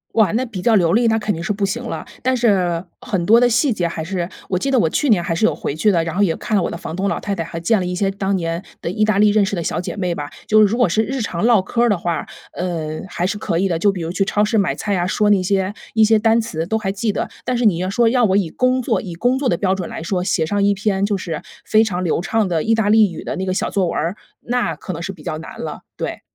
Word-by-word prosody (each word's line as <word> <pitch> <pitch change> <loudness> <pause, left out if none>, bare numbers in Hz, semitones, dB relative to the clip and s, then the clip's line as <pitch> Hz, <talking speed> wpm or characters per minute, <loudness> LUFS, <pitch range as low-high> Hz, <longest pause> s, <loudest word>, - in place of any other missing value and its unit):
哇， 215 -6 +4
那 250 +4 0
比 210 -7 -6
较 230 +1 +3
流 175 -3 +3
利， 235 +1 +3
那 225 0 +2
肯 210 -1 -1
定 165 -1 -5
是 200 - -1
不 200 -1 0
行 235 +6 -3
了。 240 - -5 0.2
但 260 0 +2
是， 185 -7 +2 0.2
很 180 -4 -2
多 225 +5 +6
的 245 0 +4
细 235 +3 +2
节 180 -4 -1
还 165 - -5
是 175 0 -3 0.2
我 185 - 0
记 275 +9 -1
得 260 - +4
我 165 - +3
去 290 - 0
年 205 -6 +4
还 165 - -1
是 170 - -2
有 - - +3
回 140 - -4
去 210 +7 +3
的， 170 -3 +2
然 165 - -4
后 205 - +3
也 175 -5 +2
看 215 - -2
了 190 - +3
我 - - -2
的 - - -5
房 160 -1 -6
东 195 +2 0
老 - - -1
太 200 - -3
太， 165 - -2
还 165 +1 -6
见 195 +7 +2
了 - - -2
一 180 - -3
些 195 +2 0
当 195 0 -2
年 165 0 -2 0.2
的 - - -3
意 205 +4 0
大 215 -2 +2
利 210 0 +6
认 205 -1 +3
识 195 - -2
的 170 - -1
小 165 - -2
姐 - - -5
妹 180 -3 -1
吧。 145 -2 -5 0.2
就 215 - +5
是 - - +7
如 220 +4 -1
果 245 -5 +4
是 215 +6 +1
日 265 +4 -3
常 200 -2 -2
唠 230 -5 +5
嗑 230 +5 -2
儿 240 - +4
的 205 - +2
话， 170 -1 -2 0.3
呃， 160 -4 -3
还 175 0 -1
是 200 +2 -2
可 170 -5 -1
以 195 - +2
的， 170 -3 0
就 200 +5 +3
比 190 - -6
如 165 - -3
去 195 - +1
超 205 +1 +1
市 220 +2 0
买 200 -4 +2
菜 205 -2 -2
啊， 175 - 0
说 210 +3 +1
那 195 -3 +4
些 195 0 0 0.2
一 220 - +4
些 220 +1 +4
单 225 +1 +3
词 165 -8 -3
都 220 +6 0
还 215 -3 -3
记 210 +1 -1
得。 - - -2 0.2
但 250 - -1
是 240 - 0
你 195 -6 +4
要 185 +1 -1
说， 235 +4 +2
要 245 +1 +3
我 195 -3 +3
以 180 -5 0
工 255 +4 +1
作 250 - 0
以 185 -7 -7
工 245 +8 +1
作 270 -2 0
的 170 - +1
标 190 0 +1
准 185 -3 -5
来 - - -6
说， 180 +2 -1
写 180 -4 +1
上 200 +5 0
一 200 0 +4
篇 200 0 0
就 205 -1 0
是 170 -4 -5 0.2
非 220 0 +4
常 185 -5 -2
流 165 - 0
畅 220 +2 0
的 165 -3 0
意 225 - +2
大 220 -2 +1
利 215 -3 +5
语 165 - -7
的 - - -3
那 190 - -3
个 185 - -1
小 - - -1
作 195 -2 +1
文 - - -2
儿， 165 +5 -1 0.2
那 245 0 -1
可 185 - -6
能 165 - -6
是 190 - -4
比 185 - -14
较 155 - -3
难 160 - -10
了， - - -5 0.2
对。 - - -4
195 Hz, 345 characters per minute, -19 LUFS, 175-220 Hz, 0.3 s, 是